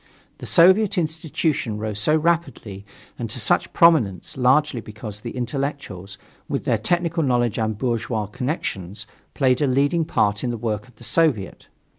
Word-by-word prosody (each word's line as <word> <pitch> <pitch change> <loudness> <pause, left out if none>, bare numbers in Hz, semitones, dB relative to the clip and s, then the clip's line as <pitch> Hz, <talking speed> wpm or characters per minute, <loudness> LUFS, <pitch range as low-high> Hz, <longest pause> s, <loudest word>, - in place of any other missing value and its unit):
The - - -7
soviet 190 +4 +5
institution 155 -7 -1
rose 105 -1 -4
so 150 +9 +2
rapidly, 155 - -2 0.3
and - - -4
to - - -4
such - - +1
prominence, 150 - +3
largely 130 0 +2
because 110 -1 -9
the 120 +3 -7
intellectuals, 125 -7 -4 0.3
with - - -2
their - - +1
technical 175 -1 0
knowledge 120 -5 +1
and 110 -2 -1
bourgeois 115 -2 -1
connections, 105 - -4 0.3
played 130 -1 +2
a 145 - +3
leading 140 +5 +2
part 105 -7 0
in 125 - -1
the 120 - -3
work 110 -1 -3
of 125 - -21
the - - -16
soviet. 140 - 0
125 Hz, 155 wpm, -22 LUFS, 105-155 Hz, 0.3 s, soviet